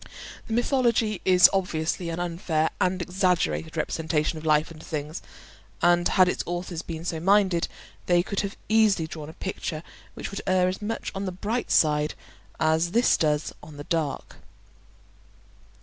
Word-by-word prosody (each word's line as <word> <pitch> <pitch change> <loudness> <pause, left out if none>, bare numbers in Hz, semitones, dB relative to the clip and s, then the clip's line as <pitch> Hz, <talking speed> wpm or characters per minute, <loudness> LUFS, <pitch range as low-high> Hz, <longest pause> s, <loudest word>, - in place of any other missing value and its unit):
The 225 - -4
mythology 235 -4 +1
is 180 -2 +8
obviously 170 -2 -1
an 165 +1 -4
unfair 165 -2 -1
and 185 0 +1
exaggerated 180 -3 0
representation 160 0 -1
of 155 - -11
life 155 +1 +3
and 155 -1 -11
things; 155 +1 -5 0.6
and 175 0 +4
had 185 -1 +4
its - - -1
authors 175 -1 -4
been 165 -1 -7
so 165 -2 -2
minded 190 -1 +3 0.4
they 175 -1 +4
could 200 +1 -3
have 200 -1 -3
easily 215 -6 +3
drawn 155 -1 -8
a - - -10
picture 165 -4 -5 0.3
which - - -6
would 200 - -5
err 185 -1 +3
as 185 +2 -3
much 220 +2 -3
on 195 +1 -4
the 185 - -2
bright 210 +7 -3
side 150 -1 +3 0.4
as 160 +2 +2
this 235 +2 +4
does 150 -2 0
on 150 -2 -12
the 145 - -6
dark. 155 -3 -3
175 Hz, 160 wpm, -26 LUFS, 160-190 Hz, 0.6 s, is